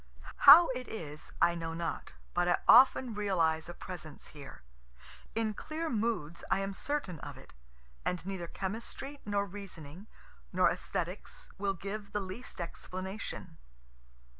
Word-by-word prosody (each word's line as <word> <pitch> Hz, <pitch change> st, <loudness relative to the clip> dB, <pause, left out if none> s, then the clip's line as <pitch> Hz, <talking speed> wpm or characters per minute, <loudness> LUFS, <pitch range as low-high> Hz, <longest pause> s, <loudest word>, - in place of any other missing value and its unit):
How 340 Hz, +2 st, +11 dB
it 255 Hz, -1 st, -3 dB
is 150 Hz, -8 st, -6 dB
I 170 Hz, 0 st, +5 dB
know 165 Hz, -1 st, -4 dB
not, 170 Hz, 0 st, -4 dB, 0.2 s
but 175 Hz, 0 st, +2 dB
I 175 Hz, -, +4 dB
often 255 Hz, 0 st, +7 dB
realize 170 Hz, -6 st, +1 dB
a -, -, -5 dB
presence 160 Hz, -5 st, -8 dB
here 140 Hz, -, -11 dB, 0.7 s
in 220 Hz, -1 st, +1 dB
clear 315 Hz, +8 st, -4 dB
moods 210 Hz, -8 st, -1 dB
I 195 Hz, -, +2 dB
am 195 Hz, 0 st, -2 dB
certain 195 Hz, -, -3 dB
of -, -, -8 dB
it, -, -, -15 dB, 0.5 s
and 180 Hz, -1 st, -2 dB
neither 190 Hz, -3 st, -4 dB
chemistry 225 Hz, +10 st, -5 dB
nor 200 Hz, -1 st, +1 dB
reasoning 190 Hz, -2 st, -9 dB, 0.4 s
nor -, -, +4 dB
esthetics -, -, -4 dB
will 195 Hz, -1 st, 0 dB
give 200 Hz, +2 st, -6 dB
the 210 Hz, -, +1 dB
least 195 Hz, +4 st, -7 dB
explanation. 185 Hz, +4 st, -6 dB
195 Hz, 140 wpm, -32 LUFS, 170-220 Hz, 0.7 s, How